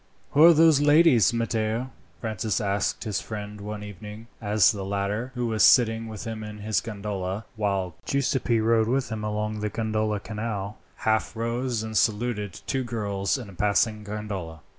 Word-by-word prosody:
"Who 150 - +5
are 170 - +10
those 160 -2 +5
ladies, 145 - +5
Matteo?" 115 +1 -1 0.3
Francis 110 -3 -1
asked 100 -1 -1
his 105 -5 -2
friend 105 -1 -7
one 105 0 -6
evening, 105 +2 -9 0.2
as 105 -2 +4
the 100 -3 -5
latter, 100 +5 -2
who 125 -1 -1
was 110 -2 -1
sitting 115 -2 +5
with 110 0 -7
him 110 -2 -5
in 105 0 -7
his 105 0 -1
gondola, 100 -2 -4
while 100 -4 -1
Giuseppi 130 -3 +1
rowed 115 +3 +3
them 110 -3 -5
along 105 0 -2
the 105 0 -2
Grand 110 -1 -1
Canal, 105 -2 -4 0.2
half 110 +1 0
rose 115 0 -2
and 110 0 -6
saluted 105 -3 0
two 135 -1 -1
girls 105 -3 -1
in 125 -5 -7
a 100 - -12
passing 105 +3 +1
gondola. 100 -6 -6
110 Hz, 160 wpm, -26 LUFS, 105-115 Hz, 0.3 s, are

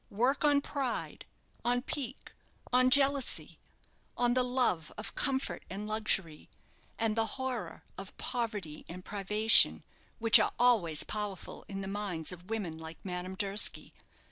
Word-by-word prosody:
Work 245 +9 +1
on 290 -1 +4
pride, 275 -3 -4 0.4
on 245 +1 +1
pique, 265 -3 -5 0.4
on 255 0 +5
jealousy, 275 0 +2 0.6
on 240 0 +3
the 255 - +3
love 245 -11 0
of 210 - -6
comfort 270 0 -2
and 200 +3 -5
luxury, 200 -7 -1 0.5
and 225 -1 0
the 225 -1 +1
horror 260 -3 -4 0.2
of 195 0 -8
poverty 210 -10 -4
and 180 +2 -8
privation, 210 +2 +5 0.3
which 225 -2 +7
are - - +1
always 210 -11 +3
powerful 210 -3 -5
in 195 -1 -5
the 195 - -5
minds 195 -5 -2
of 180 +2 -11
women 190 -8 -3
like 160 0 -8
Madame 180 0 -4
Durski. 200 +1 -2
215 Hz, 140 wpm, -31 LUFS, 190-250 Hz, 0.6 s, which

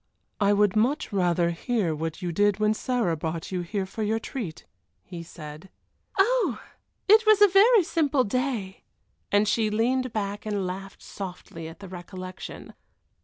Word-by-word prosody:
"I 200 -1 +3
would 205 -1 +3
much 245 +4 +1
rather 175 -2 +2
hear 190 -1 -1
what 160 +2 -4
you 175 - -1
did 205 +3 +2
when 215 0 +2
Sarah 225 -7 0
brought 160 +2 -4
you 180 -1 -1
here 190 +3 -3
for 205 +4 -7
your 215 +1 +1
treat," 225 -7 -6 0.4
he 175 -2 -8
said. 155 +1 -10 0.5
"Oh! 390 - +2 0.5
it 435 +2 +7
was 430 -2 +7
a 415 - +8
very 405 +3 +6
simple 295 -5 +1
day," 230 -4 -2 0.5
and 205 +1 +3
she 215 +1 +2
leaned 250 +4 +1
back 205 -1 -3
and 205 -3 -1
laughed 195 +1 -7
softly 180 -4 -8
at 165 +5 -11
the 195 - -8
recollection. 185 +1 -8
205 Hz, 160 wpm, -26 LUFS, 180-250 Hz, 0.5 s, a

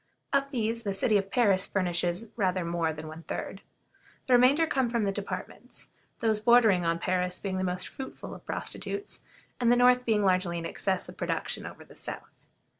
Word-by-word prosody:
Of 275 0 +2
these 230 -3 -1
the 200 -3 -2
city 210 +3 +2
of 195 0 -5
Paris 200 -5 +3
furnishes 180 +2 0
rather 185 -5 0
more 170 -1 0
than 155 0 -7
one 155 +1 -8
third. - - -5 0.6
The 255 - +2
remainder 260 +6 +6
come 265 -6 +1
from 235 -2 0
the 200 - +1
departments; 200 0 -6 0.3
those 220 -2 +2
bordering 220 -6 +5
on 165 0 +1
Paris 180 +1 0
being 190 -2 -3
the - - -1
most 180 0 -2
fruitful 265 - -8
of - - -11
prostitutes, 405 0 -4 0.4
and 240 -1 +4
the - - +6
north 250 0 +5
being 220 -3 +2
largely 185 -2 +2
in 165 - -4
excess 190 +2 -1
of - - -11
production - - -2
over - - -11
the - - -16
south. - - -8
200 Hz, 190 wpm, -29 LUFS, 180-240 Hz, 0.6 s, remainder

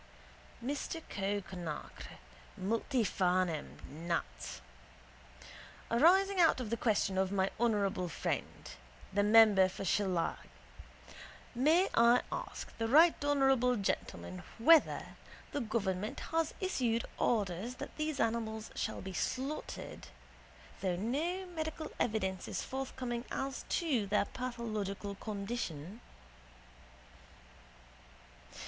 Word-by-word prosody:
Mr 290 +4 -3
Cowe 200 +1 -1
Conacre 175 -5 -7 0.4
(Multifarnham. 185 - 0
Nat.): 160 - -4 1.3
Arising 370 +10 +5
out 330 -5 +5
of 235 -4 -4
the - - +2
question 205 -4 +1
of 190 0 +1
my 195 -1 +1
honourable 200 -6 +1
friend, - - -3 0.4
the 205 - +3
member 205 -3 +7
for 190 - -6
Shillelagh, 185 -4 +1 1.1
may 315 +10 +4
I 235 +1 +5
ask - - -6
the 225 - 0
right 315 +7 +7
honourable 270 -3 +3
gentleman 90 - -3 0.2
whether 310 +7 +5 0.5
the 290 - -2
government 210 -3 -2
has 325 -1 0
issued 245 - 0
orders 210 +1 0
that - - -8
these 305 -2 -2
animals 220 -1 -1
shall - - -3
be 190 - -6
slaughtered 265 +10 -4 0.7
though 185 -2 0
no 305 - -1
medical 315 -3 -5
evidence 190 -5 -1
is - - -3
forthcoming 255 -2 -4
as 270 0 -3
to 270 - +1
their 205 +1 +2
pathological 215 -5 -4
condition? 200 -3 -5
225 Hz, 100 wpm, -33 LUFS, 190-270 Hz, 1.3 s, member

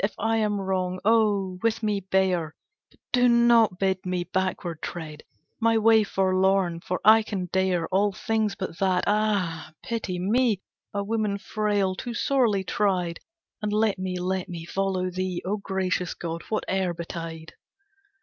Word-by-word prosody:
If 200 - 0
I 225 +1 +1
am 210 -2 0
wrong, 185 -1 -1
oh! 205 -4 +2
with 230 0 0
me 210 -2 +1
bear; 185 -4 0 0.3
But - - -28
do 245 -1 +5
not 235 -4 +5
bid 190 -1 0
me 180 -1 -1
backward 180 -2 -2
tread 155 -3 -6 0.4
My 230 0 +3
way 220 0 +5
forlorn, 190 -2 +1
for 180 +2 -3
I 220 +1 +8
can 195 -4 -4
dare 185 -3 +1
All 200 +2 +2
things 215 0 -1
but 185 -4 -6
that; 185 -2 +2
ah! 200 -7 0
pity 220 -6 -3
me, 215 +3 +2 0.3
A 200 0 -2
woman 210 -1 -1
frail, 205 -2 0
too 235 +5 -6
sorely 230 -9 +2
tried! 185 -4 0 0.4
And 210 -1 -2
let 210 -2 +1
me, 185 -1 -3
let 185 0 -2
me 170 -2 -6
follow 185 0 -1
thee, 185 -1 -2
O 200 +3 -1
gracious 190 -3 -2
god, 170 -1 -5
whate'er 190 -4 -1
betide. 165 -1 -7
190 Hz, 155 wpm, -26 LUFS, 180-215 Hz, 0.4 s, I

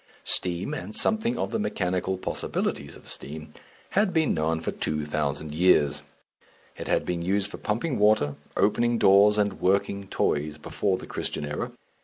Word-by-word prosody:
Steam, 90 0 +2
and 100 +5 -6
something 220 +2 +2
of - - -2
the 225 - -1
mechanical 95 - -1
possibilities 70 -5 -3
of - - -15
steam, 75 +1 -5 0.4
had 205 0 +2
been 160 -3 +2
known 80 +1 0
for 80 - -3
two 75 -1 -2
thousand 75 0 -2
years; 75 -4 +3 0.7
it - - -7
had - - +1
been 85 -1 -2
used 95 +3 0
for - - -7
pumping 120 +6 -1
water, 105 -9 +3 0.2
opening 120 +3 +2
doors, 100 +1 +6
and 105 -1 0
working 100 +1 +1
toys, 75 -4 -1
before 95 +5 -1
the - - -9
Christian - - -3
era. 75 0 -4
95 Hz, 160 wpm, -26 LUFS, 75-105 Hz, 0.7 s, doors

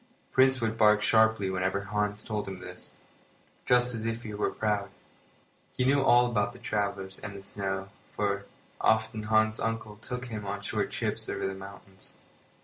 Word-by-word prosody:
Prince 130 0 +5
would 115 0 -1
bark 105 -1 +5
sharply 110 -3 +4
whenever 95 +1 0
Hans 105 +1 -1
told 105 -2 -3
him 95 -1 -5
this, 90 0 -9 0.7
just 125 0 +4
as 110 -2 -3
if 115 +1 -3
he 110 - -6
were 105 - 0
proud. 105 -2 -1 0.9
He 125 - +2
knew 140 +1 +4
all 125 -2 +6
about 105 -4 -1
travellers, 100 -2 -2
and 100 -2 -7
snow, 95 -1 -2 0.3
for, 100 -1 -1 0.3
often, 110 0 +2
Hans's 110 0 +2
uncle 115 -2 -3
took 125 +3 -5
him 110 -4 -5
on 100 0 -4
short - - -1
trips - - -2
over - - -2
the 95 - -1
mountains. 95 0 -11
105 Hz, 160 wpm, -29 LUFS, 100-110 Hz, 0.9 s, all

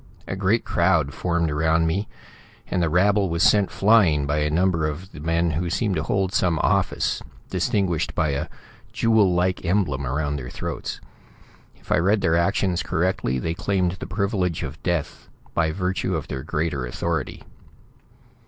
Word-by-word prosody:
A - - -3
great 100 +4 +1
crowd 85 -5 +2
formed 85 0 0
around 80 +2 +2
me, 95 +6 -1 0.6
and 90 - -1
the 85 - +2
rabble 100 +3 +3
was 85 +2 0
sent 105 -2 +4
flying 95 -9 +4
by 75 +2 0
a 75 0 +1
number 85 -1 +1
of 80 +6 -6
the 80 - -10
men 85 +2 +1
who 85 +4 -2
seem 105 +3 0
to 80 - 0
hold 95 +4 -1
some 85 -3 +2
office, - - +1 0.3
distinguished 90 -6 0
by 75 - +1
a 70 +1 -2 0.4
jewel 110 -5 +3
like 90 +1 0
emblem 85 -8 0
around 70 +2 -1
their 60 -2 -6
throats. - - -5 0.7
If - - -14
I - - +4
read 100 +4 +2
their 80 -2 +2
actions 90 0 +1
correctly, 85 -7 0
they 80 +6 -2
claimed 95 -2 0
the - - -6
privilege 95 -2 -1
of 70 +5 -7
death 85 -5 -3 0.2
by 80 -2 +1
virtue 90 +2 -1
of - - -4
their 65 - -4
greater 75 -2 -2
authority. 80 +2 -3
85 Hz, 165 wpm, -23 LUFS, 75-95 Hz, 0.7 s, sent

